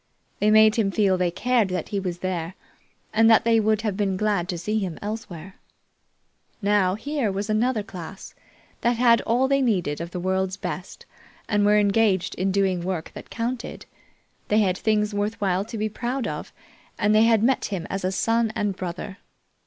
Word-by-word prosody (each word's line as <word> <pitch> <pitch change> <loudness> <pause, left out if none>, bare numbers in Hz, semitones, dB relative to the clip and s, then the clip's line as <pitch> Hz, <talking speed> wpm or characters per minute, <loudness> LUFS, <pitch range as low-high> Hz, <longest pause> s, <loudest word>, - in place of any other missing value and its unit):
They 210 - +3
made 215 +1 +6
him 215 -4 +2
feel 195 -1 +2
they 180 -1 +1
cared 235 +4 +1
that 180 -3 -4
he 200 - -1
was 180 -2 -4
there, 175 -1 -3 0.6
and 225 +1 +5
that 225 - +6
they 230 -1 +4
would 215 0 +1
have 210 -4 -1
been 195 -2 0
glad 200 -4 0
to 175 - -2
see 210 +6 -1
him 185 -6 -4
elsewhere. 195 -4 -7 1.0
Now 200 -3 +2
here 270 -1 -2
was 200 +2 -3
another 220 0 +1
class, 190 -2 -9 0.5
that 240 +1 +2
had 235 -1 +5
all 245 +4 +1
they 275 0 +2
needed 180 - 0
of 170 - -5
the 180 - -5
world's 190 +1 -1
best 180 0 -6 0.4
and 205 -1 +2
were 210 0 +5
engaged 205 -2 +2
in 190 +1 -1
doing 190 -2 +1
work 175 -2 -4
that - - -10
counted. 240 +1 -4 0.6
They 210 - +2
had 185 -3 +1
things 210 -1 +1
worth 205 +2 -2
while 190 -1 +1
to 225 +1 -7
be 215 0 0
proud 240 +4 -3
of; - - -5 0.5
and 210 0 +2
they 215 +1 +5
had 225 -2 +3
met 260 +3 +2
him 185 -4 -4
as 195 0 -4
a 185 - 0
son 225 +3 +1
and 205 -3 -1
brother. 185 +3 -6
205 Hz, 190 wpm, -24 LUFS, 185-225 Hz, 1.0 s, made